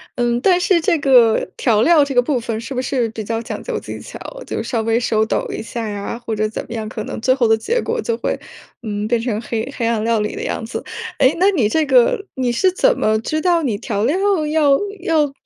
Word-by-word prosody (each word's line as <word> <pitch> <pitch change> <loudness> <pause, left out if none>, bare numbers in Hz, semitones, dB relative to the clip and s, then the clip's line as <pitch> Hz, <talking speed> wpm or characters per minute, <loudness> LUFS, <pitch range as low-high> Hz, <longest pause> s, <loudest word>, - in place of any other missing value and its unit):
嗯， 240 -1 +1
但 360 +3 +4
是 360 -1 +3
这 330 - +2
个 245 -5 +4
调 220 -4 +2
料 325 +1 +5
这 280 -2 -4
个 245 - +6
部 255 0 0
分 225 -1 -4
是 250 +4 -6
不 255 - -1
是 250 -2 0
比 220 0 -6
较 225 +2 -2
讲 230 - -6
究 480 -3 -3
技 - - -8
巧， - - -9 0.3
就 - - -3
稍 230 -3 -1
微 225 +1 +1
手 220 -2 +1
抖 - - -1
一 - - -4
下 225 0 -5
呀， 205 +2 -4
或 225 -2 -2
者 215 0 0
怎 - - -5
么 - - -8
样， 220 -1 -4
可 - - -5
能 - - -6
最 255 +2 +3
后 240 -4 +2
的 225 - +5
结 465 - -1
果 470 0 -2
就 230 - -2
会， - - -2 0.4
嗯， 210 -2 -3
变 235 -1 +1
成 230 -3 -2
黑 230 +3 -3
黑 230 - -1
暗 225 -2 0
料 230 -1 +1
理 210 - -2
的 - - -5
样 - - -3
子。 225 - -5 0.4
诶， 265 +1 +4
那 385 +2 +5
你 250 - +1
这 315 +5 +1
个 265 - +3
你 255 -2 0
是 370 +10 +2
怎 - - +2
么 215 0 +2
知 310 +7 -2
道 345 -1 +2
你 235 -8 -1
调 205 -1 -2
料 320 +7 +1 0.3
要 295 -3 +3 0.2
要， 305 -5 +2
240 Hz, 270 characters per minute, -19 LUFS, 225-295 Hz, 0.4 s, 个